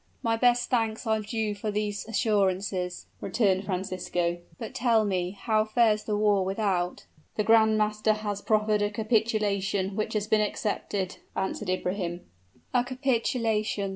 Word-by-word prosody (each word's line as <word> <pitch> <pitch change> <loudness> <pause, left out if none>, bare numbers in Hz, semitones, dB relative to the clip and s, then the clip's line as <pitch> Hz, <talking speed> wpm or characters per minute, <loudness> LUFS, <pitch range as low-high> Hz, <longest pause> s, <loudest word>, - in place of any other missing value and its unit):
"My 230 -1 +2
best 245 +1 +2
thanks 225 -2 0
are 220 -1 +2
due 215 0 -2
for 205 +1 -4
these 205 -1 -2
assurances," 195 -5 0
returned 195 -4 +1
Francisco. 180 -2 -2 0.2
"But 225 -3 -7
tell 230 -3 +3
me 180 -3 0
how 215 -2 +2
fares 215 -1 +2
the 210 -1 0
war 205 -2 +3
without?" 190 -2 -1 0.3
"The 210 - +1
grand 220 0 +5
master 215 0 +2
has 210 -2 -4
proffered 215 -1 +2
a 205 - +2
capitulation, 205 -3 0
which 215 - -2
has 210 -1 0
been 215 0 +3
accepted," 205 -2 -2 0.2
answered 190 -1 -2
Ibrahim. 180 -1 -2 0.5
"A 245 -1 +4
capitulation!" 230 -5 0
210 Hz, 140 wpm, -27 LUFS, 195-220 Hz, 0.5 s, grand